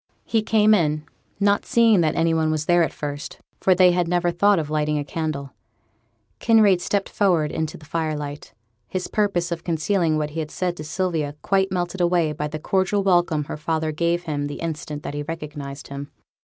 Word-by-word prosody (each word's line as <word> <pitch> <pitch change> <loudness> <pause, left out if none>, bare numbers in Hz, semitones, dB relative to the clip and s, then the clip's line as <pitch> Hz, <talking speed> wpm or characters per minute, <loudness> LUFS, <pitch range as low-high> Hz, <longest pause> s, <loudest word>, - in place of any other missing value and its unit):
He 225 - +1
came 215 0 +4
in, 155 -6 +1 0.4
not 200 0 +3
seeing 225 -5 +4
that 155 -1 +1
any 165 0 +2
one 160 -1 +1
was 155 -1 -1
there 175 +1 +4
at 165 - +1
first; 145 0 -6 0.2
for 185 - +4
they 180 0 +6
had 175 -1 +1
never 175 0 +1
thought 200 +4 +3
of 155 -2 -2
lighting 150 0 0
a 145 - -2
candle. 150 -3 -4 0.9
Kinraid 215 -6 +4
stepped 200 +1 -1
forward 170 -7 +1
into 160 -1 -3
the 155 - -15
firelight; 150 -2 -4 0.4
his 185 -1 -3
purpose 195 -5 0
of 170 -1 -3
concealing 165 0 +1
what 150 -1 -2
he 165 - -4
had 155 -1 -3
said 180 +1 -2
to 155 - -6
Sylvia 155 -3 -2
quite 195 -1 +1
melted 180 0 -2
away 170 -3 +2
by 150 0 -3
the 155 +1 -5
cordial 190 +5 0
welcome 175 -5 +2
her 145 - -6
father 155 0 -1
gave 170 +3 0
him 145 -3 -2
the 145 - -5
instant 150 -2 -5
that - - -5
he 145 - -3
recognized 145 -3 -7
him. 140 +1 -6
165 Hz, 195 wpm, -23 LUFS, 150-185 Hz, 0.9 s, they